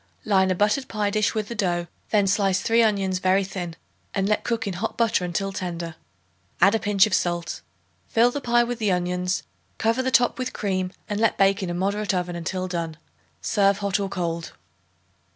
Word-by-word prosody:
Line 190 -1 +3
a 185 - +2
buttered 210 +8 +1
pie 210 -1 -1
dish 215 +1 +1
with 215 -2 -1
the 235 - -5
dough; 175 -5 0 0.2
then 205 -2 +3
slice 195 -1 +2
three 230 +4 +3
onions 195 -4 +1
very 185 +1 +3
thin 180 -3 -5 0.4
and 195 -1 +1
let 210 0 +1
cook 230 -1 -1
in 200 - -2
hot 200 +6 -3
butter 230 -5 +2
until 185 +3 -2
tender; 170 -3 -4 0.7
add 195 +4 +6
a 225 - +2
pinch 205 -1 +4
of 215 - -3
salt. 175 -3 -1 0.5
Fill 235 +2 +4
the 285 - -4
pie 240 -1 +3
with 240 0 -4
the 210 -3 +1
onions, 180 +1 -1 0.3
cover 230 +3 +1
the 260 - 0
top 245 0 +3
with 255 0 -3
cream 185 -2 -1 0.2
and 205 -1 -2
let 225 -1 +2
bake 195 +1 +3
in 185 - -3
a 175 - -2
moderate 200 +2 0
oven 180 -1 -2
until 185 +2 -3
done. 165 -3 -4 0.4
Serve 200 -2 +2
hot 200 -1 0
or 195 -1 -2
cold. 170 -3 -3
195 Hz, 200 wpm, -24 LUFS, 180-215 Hz, 0.7 s, add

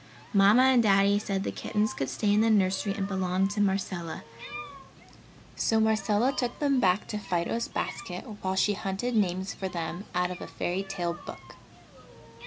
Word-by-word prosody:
Mamma 205 +5 +6
and 260 -2 +5
Daddy 200 -1 +4
said 195 -2 -2
the - - -2
kittens 215 0 -1
could 135 -9 -3
stay 205 +11 +1
in 210 - +4
the 225 - +3
nursery 195 -1 +2
and 195 -2 -2
belong 190 -1 0
to 205 0 -1
Marcella, 190 -4 -1 1.3
so 225 - +2
Marcella 220 +3 +2
took 245 -2 -2
them 280 -3 +2
back 190 -2 +2
to 210 - -3
Fido's 185 +4 -1
basket 180 -4 -4 0.2
while 190 0 -1
she 205 +2 +3
hunted 195 +5 -3
names 190 -2 0
for 190 - -4
them 175 +3 -4
out 180 0 +1
of 180 - -7
a - - -6
fairy 180 +2 -2
tale 185 -3 -3
book. 175 - -11
195 Hz, 170 wpm, -28 LUFS, 185-215 Hz, 1.3 s, Mamma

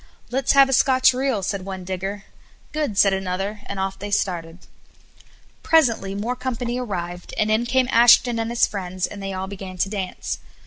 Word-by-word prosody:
"Let's 260 0 +1
have 275 -1 +7
a 270 - -1
Scotch 260 0 +4
reel," 255 -5 -1
said 195 0 -2
one 190 -1 -6
digger. 190 +2 -4 0.5
"Good," 300 -10 -2
said 195 -1 +5
another; 195 +2 -3
and 200 - -5
off 195 0 -3
they 205 +2 -5
started. 175 -4 -2 1.0
Presently 230 -11 +2
more 225 +5 -2
company 250 -1 -3
arrived, 180 -7 -5
and 215 0 +1
in 225 +2 +1
came 260 +1 +2
Ashton 240 0 +6
and 225 0 -2
his 235 0 +3
friends, 185 -2 -3
and 205 - -8
they 195 0 -4
all 190 0 -3
began 190 -1 -8
to 195 - 0
dance. 195 -3 -4
205 Hz, 180 wpm, -22 LUFS, 190-240 Hz, 1.0 s, have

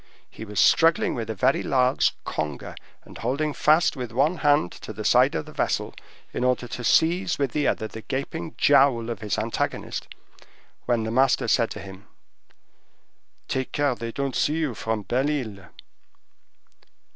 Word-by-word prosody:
He 110 - -9
was 105 -2 -4
struggling 165 - +4
with 115 -3 -4
a 110 - -3
very 130 +6 +2
large 130 -1 +2
conger, 75 -3 -4 0.3
and - - -13
holding 145 +6 -1
fast 155 +3 +3
with 125 -4 -5
one 145 +9 +1
hand 145 - +2
to - - -9
the - - -7
side - - +4
of - - -2
the - - -11
vessel, - - -1 0.4
in - - -2
order 125 -1 +1
to 125 - -6
seize 175 +7 +2
with 140 -3 -1
the 150 +2 0
other 110 - -1
the 110 - -9
gaping 145 +6 -5
jowl 135 -5 +4
of 115 - -5
his 105 -4 -2
antagonist, - - -3 0.8
when 120 -2 +1
the 110 - -3
master 130 +2 +2
said 115 -2 +2
to - - -7
him, 95 +1 -11 1.4
"Take 130 -1 -2
care 145 -2 +1
they 115 -1 -6
don't 140 +1 -3
see 150 - +1
you 155 -6 -1
from 110 -1 -3
Belle 130 +7 0
Isle!" 110 - -4
125 Hz, 170 wpm, -25 LUFS, 110-145 Hz, 1.4 s, struggling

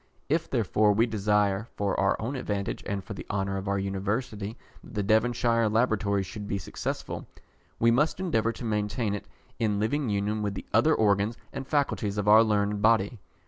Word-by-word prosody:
If 160 +3 +1
therefore 105 -3 +2
we 110 +3 +3
desire, 105 -1 +1
for 100 -1 -1
our 95 0 +2
own 120 +6 -3
advantage 100 -6 -3
and 100 -1 -2
for 100 - -7
the 100 - -7
honour 95 -1 -1
of 95 +1 -5
our 100 0 +1
University, 100 +3 -3 0.3
that - - -13
the 105 - 0
Devonshire 115 +1 +2
Laboratory 105 -3 +1
should 105 +2 -7
be 100 - -1
successful, 95 - -5 0.5
we 115 0 +4
must 150 +9 +2
endeavour 115 -12 +1
to 120 - -7
maintain 105 0 -1
it 105 - -5 0.3
in 105 -3 +1
living 130 +5 0
union 105 +1 0
with 100 -1 -2
the - - -6
other 155 0 +4
organs 105 +2 +2 0.2
and 135 - -5
faculties 130 -9 0
of 105 0 -1
our 110 +2 +8
learned 105 -1 +1
body. 110 0 +3
105 Hz, 185 wpm, -27 LUFS, 100-115 Hz, 0.5 s, our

